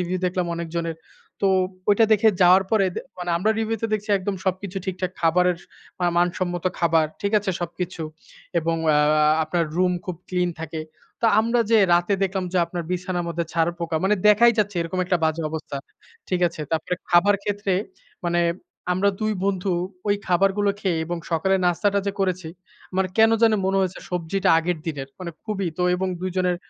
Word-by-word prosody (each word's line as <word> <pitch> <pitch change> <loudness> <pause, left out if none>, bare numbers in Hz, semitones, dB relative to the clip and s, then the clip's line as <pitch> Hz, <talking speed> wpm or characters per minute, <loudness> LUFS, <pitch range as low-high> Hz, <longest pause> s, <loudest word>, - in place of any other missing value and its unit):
Review 180 +1 -1
দেখলাম 180 -1 -1
অনেকজনের। 165 -1 -3 0.5
তো - - +4 0.4
ঐটা 220 +2 +5
দেখে 215 +1 +5
যাওয়ার 185 +2 +6
পরে 215 -3 +3 0.3
মানে 175 0 -3
আমরা 195 +6 +1
রিভিউতে 225 0 -1
দেখছি 215 0 -2
একদম 195 +1 -3
সবকিছু 190 0 -2
ঠিকঠাক। 185 -1 -2
খাবারের 175 +1 +3 0.4
আ - - +3
মানসম্মত 175 0 0
খাবার 165 -2 +3
ঠিক 200 +1 -1
আছে 205 -1 -2
সবকিছু। 175 0 -4 0.6
এবং 165 0 0 0.2
আ - - +4
আ - - +4 0.5
আপনার 170 +2 0
রুম 180 0 +3
খুব 180 -2 -5
ক্লিন 180 -1 0
থাকে। 160 0 -5 0.4
তো 230 - +3
আমরা 235 +2 +1
যে 225 - +6 0.2
রাতে 175 +3 +2
দেখলাম 190 -1 0
যে, 185 - +2
আপনার 170 0 -4
বিছানার 180 -1 -2
মধ্যে 170 0 -2
ছাড়পোকা 165 0 -1
মানে 210 - +4
দেখাই 235 +3 +6
যাচ্ছে 205 -3 +1
এরকম 165 +2 -4
একটা 180 -1 +1
বাজে 160 +1 0
অবস্থা। 155 -3 -5 0.5
ঠিক 180 -1 0
আছে? 165 - -10
তারপরে 160 +2 -1 0.2
খাবার 185 +4 +5
ক্ষেত্রে 205 -1 -1 0.5
মানে 175 0 +1 0.5
আমরা 190 +3 +2
২ 215 0 +1
বন্ধু 195 -1 0 0.3
ঐ - - +2 0.2
খাবারগুলো 195 +3 +2
খেয়ে 180 -5 0
এবং 175 0 -3
সকালের 190 +4 +2
নাস্তাটা 200 +3 +2
যে 200 - 0
করেছি। 185 -3 -1 0.5
মানে 190 0 +1
কেন 225 0 +7
জানি 225 -2 +5
মনে 195 0 +2
হয়েছে 190 -1 -1
সবজিটা 180 +2 -1
আগের 170 +1 -1
দিনের। 140 -4 -4
মানে 180 -2 -5
খুবই 200 -5 -2
তো 180 - +1
এবং 190 +1 -1
২ 185 - -2
জনের 180 -1 +1
180 Hz, 175 wpm, -23 LUFS, 170-195 Hz, 0.6 s, কেন